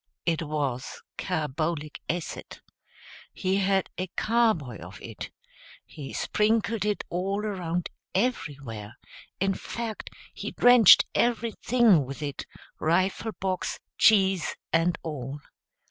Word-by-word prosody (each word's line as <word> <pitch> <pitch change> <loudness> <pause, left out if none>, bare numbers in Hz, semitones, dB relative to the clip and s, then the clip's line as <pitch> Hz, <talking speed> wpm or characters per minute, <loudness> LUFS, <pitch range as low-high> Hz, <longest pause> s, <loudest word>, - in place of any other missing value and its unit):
It 165 -2 +1
was 145 -5 -3 0.2
carbolic 155 -2 -2
acid. 170 0 -4 0.7
He 190 0 0
had 195 -1 +2
a 185 - -1
carboy 220 - +1
of 90 +2 -10
it. - - -7 0.6
He 140 -3 -9
sprinkled 215 0 +1
it 210 -1 0
all 195 +4 -1
around 180 -4 -2 0.3
everywhere; 140 - -2 0.4
in 195 +1 +2
fact 225 +2 -5 0.2
he - - -6
drenched 245 -5 +8
everything 230 - +3
with 135 +3 -7
it, 140 -2 -5 0.3
rifle 185 +7 +1
box, 185 -2 -2 0.2
cheese 195 -5 +4 0.2
and 165 +1 +3
all. 145 -3 -5
180 Hz, 105 wpm, -27 LUFS, 150-210 Hz, 0.7 s, drenched